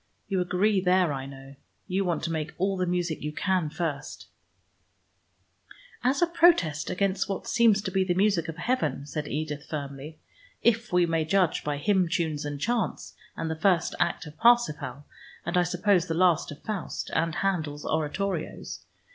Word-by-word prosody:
You 190 -2 0
agree 190 +3 +2
there 180 -3 +3
I 135 -1 -5
know; 135 0 -11 0.3
you 190 +2 0
want 175 -3 -1
to 165 - -1
make 155 -1 -3
all 195 +2 +1
the 185 -1 -1
music 175 -2 -1
you 150 - -3
can 185 -1 0
first 150 -3 -4 0.9
" - - -44 0.7
"As 265 +6 +2
a - - +7
protest 335 - +3
against 195 +1 0
what 195 - -3
seems 220 -4 +3
to 190 - -3
be 190 +1 +2
the 180 -1 0
music 190 -4 +2
of 165 0 -6
heaven," 235 - -1
said 150 +1 -4
Edith 150 -1 -3
firmly, 140 0 -6 0.5
"if 235 0 +2
we 180 -1 +4
may 165 -1 +1
judge 180 +1 +1
by 145 -1 -2
hymn 185 +3 +2
tunes 155 -3 -1
and 145 -1 -4
chants, 235 +7 -1 0.2
and 165 - -2
the 160 - -2
first 175 +1 +2
act 175 -1 0
of 150 0 -10
Parsifal, 150 - +2 0.4
and 170 - -2
I 180 - +5
suppose 180 +1 +2
the 165 - -1
last 175 -3 +3
of 150 - -11
Faust, 210 -5 -4
and 165 0 0
Handel's 155 -7 -1
oratorios. 160 +3 -3
175 Hz, 175 wpm, -27 LUFS, 155-195 Hz, 0.9 s, a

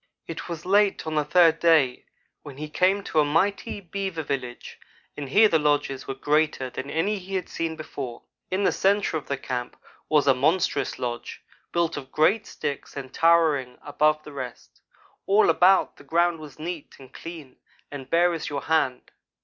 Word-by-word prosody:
"It 165 +2 -7
was 170 -1 -6
late 200 0 +3
on 160 - -3
the 150 -1 +2
third 165 0 +4
day 155 -7 +3 0.4
when 140 -3 -11
he 155 +1 -6
came 190 +5 +2
to 160 - 0
a - - +6
mighty 195 +9 0
beaver 190 -3 -4
village 125 -4 -5 0.4
and 140 -2 -6
here 215 +9 +6
the 165 -6 +2
lodges 145 -3 0
were 135 - -3
greater 145 -2 0
than 130 +3 -6
any 195 +7 0
he 190 +1 -6
had 185 - 0
ever - - -19
seen 165 -1 -2
before. 135 -6 -7 0.3
In 190 +2 0
the - - +3
centre 200 -2 +1
of 155 - -4
the 140 - -2
camp 125 -2 -5 0.3
was 150 -2 +3
a 135 - +6
monstrous 145 +1 +1
lodge 120 -1 -5 0.3
built 170 -2 0
of 135 -2 -8
great 195 +8 +2
sticks 140 0 -5
and 130 -1 -7
towering 160 -7 +3
above 150 +1 +1
the 150 - -11
rest. 130 -3 -8 0.5
All 200 -3 +5
about, 185 +4 +4
the - - -15
ground 170 0 +1
was 150 -3 -11
neat 165 0 -6
and 130 -1 -15
clean 160 -6 -10 0.3
and 140 -3 -8
bare 175 +1 +3
as 165 - -4
your 140 -3 -4
hand. 140 -6 0
155 Hz, 185 wpm, -25 LUFS, 140-175 Hz, 0.5 s, a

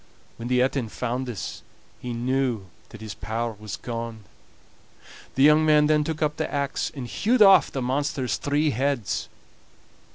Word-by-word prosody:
When 115 - -6
the 125 0 +3
Etin 130 -3 -1
found 125 +3 -3
this 120 -5 -5 0.4
he 125 - -5
knew 120 -3 -1 0.2
that 115 - -12
his 110 -1 -6
power 115 +1 -3
was 105 -1 -6
gone. 115 -2 -6 1.1
The 135 - +3
young 150 +2 +6
man 150 -1 +5
then 150 0 +3
took 155 0 -2
up 150 0 0
the 155 - -2
axe 140 -1 -1
and 135 -3 -5
hewed 210 - +3
off 195 -1 +6
the 135 - -3
monster's 130 -1 -1
three 145 +1 +1
heads. 135 -3 -1
130 Hz, 160 wpm, -25 LUFS, 115-150 Hz, 1.1 s, young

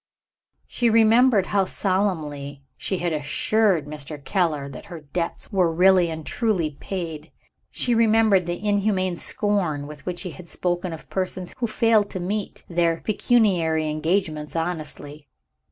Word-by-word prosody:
She 240 -2 +1
remembered 225 -1 +5
how 195 -1 +1
solemnly 155 -9 -2
she 190 - -3
had 175 -2 -1
assured 165 +4 +1
Mr. 150 0 -7
Keller 160 -8 0
that 140 - -9
her 170 -4 -8
debts 165 +8 -4
were 185 -4 +2
really 180 +1 +4
and 160 -1 -6
truly 195 -10 0
paid. 165 -5 -5 0.4
She 245 - 0
remembered 220 -5 +4
the 175 +5 -3
inhuman 200 -3 +1
scorn 175 -6 -1
with 145 -1 -10
which 180 -1 -3
he 180 - -5
had 170 0 -12
spoken 175 0 -2
of 160 - -9
persons 185 -1 -3
who 240 - 0
failed 215 -1 +3
to 185 - -5
meet 200 +3 -3
their 170 -1 +1
pecuniary 175 -9 +2
engagements 155 -1 -1
honestly. 155 -3 -4
180 Hz, 140 wpm, -24 LUFS, 155-205 Hz, 0.4 s, remembered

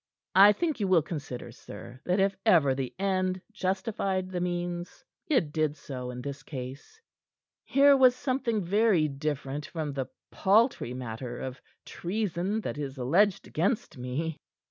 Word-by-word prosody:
I 200 +2 +9
think 320 +2 -1
you 200 - +1
will 180 -4 +4
consider, 140 -7 -6
sir, 120 +3 -11
that 180 +2 +1
if 195 0 +2
ever 145 -8 +5
the 130 -1 -4
end 185 -1 0
justified 190 -1 -1
the 180 -1 -2
means, 175 0 -3 0.2
it 250 - +2
did 155 -1 0
so 125 -3 -6
in 125 0 -6
this 140 +1 -5
case. 135 - -8 0.7
Here 280 +1 +6
was 255 -2 +6
something 255 -5 -1
very 200 -4 +3
different 145 0 -3
from 155 -4 -4
the 135 -2 -3 0.2
paltry 205 - +2
matter 120 0 -5
of 130 +2 -6 0.2
treason 195 +2 -2
that 150 - -4
is 140 -2 -4
alleged 175 +11 +2
against 185 +1 -1
me." 150 +5 -3
175 Hz, 145 wpm, -29 LUFS, 135-200 Hz, 0.7 s, I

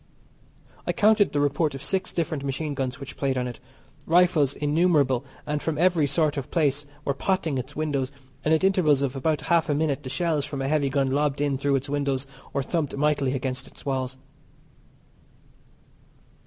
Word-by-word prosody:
I - - +1
counted 215 -2 +4
the 145 - 0
report 145 +1 +1
of 135 - -7
six 190 +5 -1
different 155 -4 -2
machine 145 +2 -2
guns 130 -1 -3
which 135 0 -8
played 135 -2 0
on 125 - 0
it. 120 - -7 0.5
Rifles 165 -5 +4
innumerable 150 -4 +2 0.2
and 150 0 -2
from 160 -2 -2
every 170 -3 +3
sort 150 +1 +1
of 135 - -4
place 145 -3 +1 0.2
were 140 - +1
potting 160 -2 0
its 125 - -7
windows, 140 -4 -1 0.3
and 155 - +1
at 160 +2 +3
intervals 165 -8 +3
of 135 -1 -1
about 150 +3 0
half 165 -1 +2
a 145 - +2
minute 145 -2 0
the 130 - -7
shells 150 +1 0
from 140 -1 -5
a - - -1
heavy 145 -1 +2
gun 135 -1 +1
lobbed 145 0 +1
in 145 -2 0
through 140 0 +2
its 135 +2 -1
windows 140 -2 -1 0.3
or 140 - -1
thumped 150 -1 -2
mightily 145 -2 +1
against 130 -1 -3
its - - -13
walls. 130 -1 -2
145 Hz, 180 wpm, -25 LUFS, 135-160 Hz, 0.5 s, counted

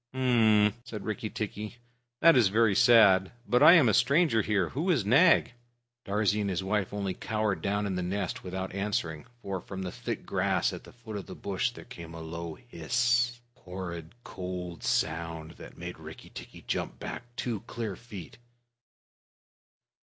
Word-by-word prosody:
"H'm!" 110 -5 +4
said 115 -4 -7
Rikki 110 0 -3
tikki, 105 +2 -5 0.4
"that 165 -2 +7
is 120 -5 +5
very 110 +1 +3
sad 100 -4 +6
but 125 +1 +3
I 155 - +10
am 160 -8 +6
a 110 - +3
stranger 140 - +3
here. 100 -5 0
Who 160 +8 -2
is 140 - +2
Nag?" 135 - +5 0.5
Darzee 105 +1 +1
and 100 - -1
his 95 0 -2
wife 100 0 -1
only 100 -2 -2
cowered 105 0 -2
down 100 +1 0
in 100 - -2
the 90 - -2
nest 95 +3 -3
without 95 0 -5
answering, 100 -5 -2 0.2
for 95 -2 -3
from 95 +1 -7
the 90 - -4
thick - - -5
grass - - 0
at - - -8
the - - -13
foot 115 -3 -8
of 100 - -7
the - - -8
bush 100 +4 -1
there 120 - -12
came 85 -10 -10
a - - -7
low 85 0 -6
hiss 120 -1 0
a - - -28
horrid 90 -1 -7
cold 90 -2 -6
sound 80 0 -1
that - - -11
made - - -7
Rikki - - -11
tikki - - -10
jump - - -3
back 120 0 -8
two 120 -4 -2
clear 110 -5 -4
feet. 100 -7 -11
105 Hz, 175 wpm, -29 LUFS, 95-120 Hz, 0.5 s, I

